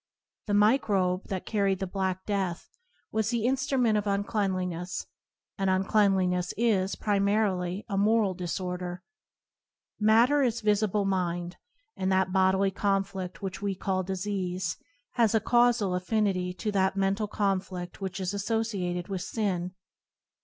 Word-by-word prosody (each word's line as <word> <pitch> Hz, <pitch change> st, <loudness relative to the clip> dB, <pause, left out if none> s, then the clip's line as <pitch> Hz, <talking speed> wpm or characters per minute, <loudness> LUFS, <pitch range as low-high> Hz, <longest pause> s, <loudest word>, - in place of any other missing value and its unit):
The 205 Hz, -, +1 dB
microbe 205 Hz, -4 st, +2 dB
that 190 Hz, -2 st, -4 dB
carried 200 Hz, -3 st, +1 dB
the 190 Hz, -, -3 dB
Q0an: -, -, -9 dB
ftmgofe^inD -, -, -28 dB
black 190 Hz, -1 st, -1 dB
death 190 Hz, -4 st, -2 dB, 0.4 s
was 220 Hz, -1 st, 0 dB
the 235 Hz, -2 st, 0 dB
instrument 260 Hz, -4 st, +2 dB
of 205 Hz, -, -4 dB
unclean 200 Hz, 0 st, 0 dB
liness, 180 Hz, -1 st, -3 dB, 0.5 s
and 195 Hz, -1 st, +1 dB
uncleanliness 190 Hz, -2 st, +2 dB
is, 205 Hz, -5 st, +1 dB
primarily, 200 Hz, -2 st, 0 dB
a 200 Hz, -3 st, -1 dB
moral 210 Hz, -1 st, +3 dB
disorder. 180 Hz, 0 st, -4 dB, 1.0 s
Matter 230 Hz, +7 st, +5 dB
is 235 Hz, -3 st, +1 dB
visible 210 Hz, -1 st, +1 dB
mind, 175 Hz, -2 st, -1 dB, 0.4 s
and 190 Hz, 0 st, -1 dB
that 190 Hz, -1 st, +2 dB
bodily 190 Hz, 0 st, +3 dB
conflict 195 Hz, -1 st, -2 dB
which 190 Hz, 0 st, -4 dB
we 200 Hz, -1 st, -1 dB
call 185 Hz, 0 st, -1 dB
disease 185 Hz, -2 st, -2 dB, 0.4 s
has 230 Hz, -2 st, +2 dB
a -, -, +5 dB
causal 240 Hz, -3 st, +3 dB
affinity 185 Hz, -1 st, 0 dB
to 180 Hz, +4 st, -3 dB
that 190 Hz, -1 st, +1 dB
mental 195 Hz, +2 st, +1 dB
confli&which 190 Hz, -2 st, -3 dB
is 185 Hz, 0 st, -2 dB
associated 200 Hz, -4 st, -2 dB
with 190 Hz, -2 st, -3 dB
sin. 180 Hz, -3 st, -2 dB
195 Hz, 135 wpm, -28 LUFS, 185-210 Hz, 1.0 s, Matter